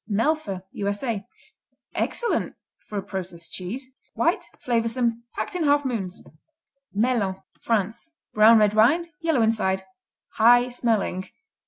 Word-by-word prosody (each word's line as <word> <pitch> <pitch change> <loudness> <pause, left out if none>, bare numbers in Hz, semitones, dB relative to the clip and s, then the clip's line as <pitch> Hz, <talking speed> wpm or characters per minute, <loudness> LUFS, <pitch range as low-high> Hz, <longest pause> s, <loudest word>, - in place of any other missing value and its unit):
Melfa 210 -4 0
U.S.A. 205 +1 -3 0.7
Excellent 475 - -1 0.3
for 210 - -5
a 195 - -2
processed 180 -4 -6
cheese. 210 +9 -5 0.3
White; - - +2 0.2
flavorsome. 230 0 0
Packed - - -3
in 350 -3 -1
half 290 0 +3
moons. 200 -8 -3 0.7
Melun 205 -3 +1 0.2
France 225 - -1 0.2
Brown 220 +2 +7
red 210 -1 +4
rind, 285 +11 +4
yellow 320 -8 +2
inside; 190 -4 +1 0.5
high 245 +2 +6
smelling. 220 -6 -1
225 Hz, 115 wpm, -25 LUFS, 195-245 Hz, 0.7 s, Brown